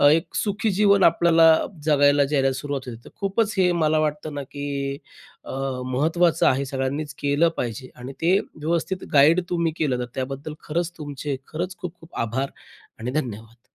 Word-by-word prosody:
एक 165 - -3
सुखी 210 +1 0
जीवन 200 0 +4
आपल्याला 165 -1 +6 0.3
जगायला 145 -1 +4
जायला 135 -1 +1
सुरुवात 135 0 -4
होते. 120 -2 -6
तर - - -11
खूपच 200 +2 0
हे 180 -2 +4
मला 155 0 +3
वाटतं 150 0 -2
ना, 145 -1 -4
की 140 0 -4 0.5
अ, - - -8 0.3
महत्त्वाचं 160 +7 +2
आहे, 135 +2 +2
सगळ्यांनीच 140 +3 -3
केलं 145 +4 +3
पाहिजे 120 +2 -4
आणि 125 +2 -7
ते 175 +4 +4
व्यवस्थित 170 +4 -3
गाईड 150 +5 +6
तुम्ही 170 -2 0
केलं, 135 -6 0
तर 125 - -2
त्याबद्दल 135 +3 -4
खरंच 170 +2 -1
तुमचे 145 -2 -4
खरंच 180 +4 -4
खूप 175 -2 -8 0.2
आभार 130 +5 -2 0.5
आणि 120 +3 -3
धन्यवाद. 115 -2 -8
150 Hz, 155 wpm, -23 LUFS, 135-170 Hz, 0.5 s, आपल्याला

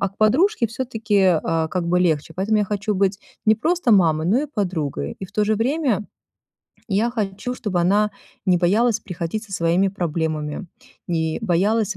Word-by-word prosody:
а 200 - +1
к 195 - -29
подружке 260 - +3
всё-таки, 225 -3 -1 0.2
а, 160 -1 0
как 180 -1 -2
бы 180 +1 +3
легче. 160 -2 0
Поэтому 205 +5 +1
я 210 - +2
хочу 205 +1 -2
быть 195 +1 +1 0.3
не 220 - +6
просто 315 +1 +1
мамой, 160 -5 +3
но 220 +9 +3
и - - -3
подругой. 165 - -3
И 190 - -4
в 185 - -22
то 210 +1 +1
же 215 +1 +2
время 240 -2 0 0.8
я 215 +4 +1
хочу, 215 +1 -3
чтобы 190 -7 -2
она 205 +4 +3 0.4
не 180 -1 +4
боялась 210 +6 +2
приходить 180 +3 -4
со 205 - -14
своими 175 +2 +2
проблемами, 160 -2 -3 0.4
не 160 -2 -1
боялась 205 +2 +1
200 Hz, 175 wpm, -22 LUFS, 175-220 Hz, 0.8 s, не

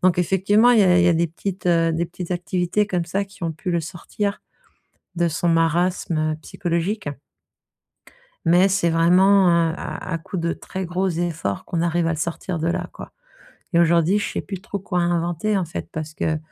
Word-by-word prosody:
Donc, 180 -1 +3
effectivement, 195 +6 +3
il 230 - +5
y - - +6
a 180 -1 +5
il 180 - +4
y - - +5
a 175 - +4
des 170 +1 +2
petites, 180 +3 -5
heu, 165 -1 +3
des 170 +2 -1
petites 175 +1 -8
activités 180 +3 0
comme 180 -4 -1
ça 195 +4 -1
qui 200 -1 -18
ont 165 - -1
pu 160 +3 -5
le 170 - +1
sortir 195 +4 -4 0.8
de 170 0 +2
son 165 +2 -1
marasme 165 -1 +1
psychologique 175 +1 -2 1.4
mais 175 +3 +5
c'est 190 -3 +1
vraiment, 185 +4 +5
heu, 170 -1 +3
à 185 - -6
à 165 - -1
coup 165 - -7
de 170 -1 -1
très 190 +2 -6
gros 185 +2 -1
efforts 165 - -2
qu'on 170 - -2
arrive 170 0 +1
à - - +1
le - - -3
sortir 170 +2 -3
de 165 +1 -1
là, 170 - -2
quoi. - - -10 0.6
Et 170 - +4
aujourd'hui, 170 +3 +3
je - - -3
sais - - -2
plus 195 -3 -7
trop 200 - -5
quoi 190 -2 -2
inventer, 175 +4 0
en 185 - -1
fait, 165 - -6
parce 155 -1 -5
que 160 0 -1
175 Hz, 205 wpm, -22 LUFS, 165-190 Hz, 1.4 s, y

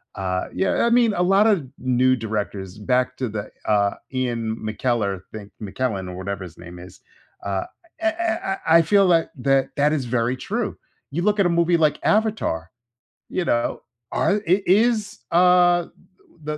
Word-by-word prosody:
uh, 95 -2 -2
yeah 195 - +1
I - - +3
mean, 235 -3 +4
a 180 - -1
lotta 195 -5 +3
new 130 0 +2
directors 105 -4 -4
back 125 +3 0
to 125 -3 -2
the, 105 0 -6
uh, 100 -1 +2 0.2
Ian 120 -3 -2
McKellar, 110 -3 -2
thing, 105 -2 -9
McKellen 100 -2 -3
or 90 - -7
whatever 100 0 -4
his 85 -2 -11
name 90 0 -11
is, 90 +1 -13 0.5
uh, 95 -1 -1 0.4
eh 330 0 +1
eh 335 - -1
I 165 +1 +7
I - - +6
feel 200 +4 +4
like 165 -2 +3
that 135 +1 +2
that 150 +2 +3
is 135 -5 -1
very 120 +1 0
true. 215 - -3 0.3
You 170 +5 -2
look 210 0 +1
at 195 - +4
a - - +3
movie 170 0 +2
like 155 -2 +2
Avatar, 210 - 0 0.6
you 180 - -2
know, 120 0 0 0.3
are 205 - +1
i 185 +4 +3
is, 210 +1 +2
uh, 175 0 +4 0.6
the 150 0 -4
130 Hz, 170 wpm, -22 LUFS, -, 0.6 s, I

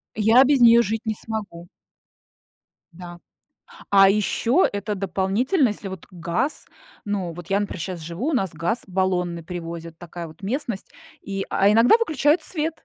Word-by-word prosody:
Я 220 +4 +5
без 275 0 +3
неё 235 0 +8
жить 220 +2 -3
не 220 -1 -1
смогу. 205 -6 -7 1.3
Да. 175 0 -10 0.7
А 195 -1 +7
ещё 220 - +2
это 205 +1 -3
дополнительно, 200 - +1
если 205 -1 -6
вот 190 -3 -9
газ 180 - -3 0.4
ну, 195 -4 -2
вот 175 0 -10
я, 195 - +2
например, 205 -3 -4
щас 180 +1 -5
живу, 170 - -5
у - - 0
нас 195 -8 0
газ 170 +10 -2
баллонный 180 -3 -1
привозят, 165 -1 -7
такая 175 0 -8
вот 160 +4 -15
местность, 230 -1 -4 0.3
и 195 -1 -4
а 200 +1 +3
иногда 230 - +6
выключают 315 - +2
свет, 320 -1 -4
195 Hz, 155 wpm, -23 LUFS, 175-235 Hz, 1.3 s, неё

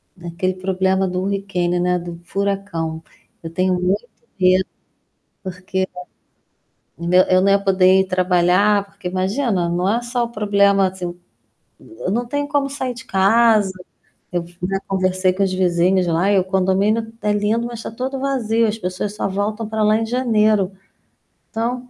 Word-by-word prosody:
naquele 175 +1 -3
problema 190 0 0
do 180 0 -2
hurricane 190 -3 -1
né, 180 0 +1
era - - -1
do 170 -1 -8
furacão. 195 -4 -3 0.4
Eu 165 - -6
tenho 185 +2 +1
muito 185 +6 -1 0.3
medo 185 0 +4 0.8
porque, 185 0 -3 1.1
né, 170 +2 +2
eu - - +8
nã - - -1
eu 185 0 +5
não 195 - +3
ia 200 - +5
poder 190 -1 +4
ir - - +2
trabalhar 185 +2 +2
porque 195 -2 -8
imagina, 190 +1 0
não 175 +2 0
é 235 - +1
só 240 0 -2
o - - -5
problema 200 -2 +3
assim, 185 -1 -5 0.7
n 335 - -7
não 240 +4 -1
tenho 285 +3 -2
como 285 -2 0
sair 260 -3 -3
de 240 +1 -10
casa, 215 0 +3 0.6
eu 175 -1 -1 0.4
conversei 185 -1 +1
com 190 +2 -2
os 190 - -1
vizinhos 185 0 +2
lá 170 +4 +2
e 200 - +4
o 185 - +2
condomínio 190 +4 +1
está 225 -2 -2
lindo 210 +3 0
mas 240 -1 -6
está - - -6
todo 260 +4 -4
vazio, 230 -5 +1
as 215 - -2
pessoas 185 +1 -4
só 210 - -2
voltam 210 +3 -2
para 220 0 -1
lá 215 0 +4
em 225 0 -1
janeiro. 215 -5 +2 0.8
Então 245 +2 -3
195 Hz, 165 wpm, -20 LUFS, 185-220 Hz, 1.1 s, eu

